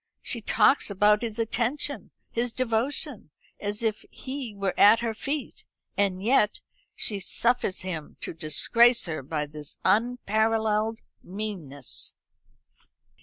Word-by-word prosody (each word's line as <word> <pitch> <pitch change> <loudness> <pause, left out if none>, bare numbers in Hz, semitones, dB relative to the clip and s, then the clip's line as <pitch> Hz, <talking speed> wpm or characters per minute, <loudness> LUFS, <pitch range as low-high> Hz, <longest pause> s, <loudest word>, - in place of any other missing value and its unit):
"She 235 - -2
talks 265 +5 +3
about 210 +1 +4
his 230 -2 -4
attention, 245 +5 -2 0.2
his 235 +1 -1
devotion, 250 - -2 0.3
as 205 +2 -2
if 220 -2 -1
he 260 -5 -6
were 195 -2 -1
at 215 +3 +6
her 230 -1 -1
feet; 280 +6 -4 0.3
and 195 -2 0
yet 220 -2 +3 0.4
she 205 -2 0
suffers 235 0 0
him 165 -5 -6
to - - -2
disgrace 230 - +4
her 160 -4 -3
by 150 +2 -3
this 150 0 -9
unparalleled 220 -1 +1 0.2
meanness!" 180 - -4
215 Hz, 120 wpm, -27 LUFS, 190-235 Hz, 0.4 s, at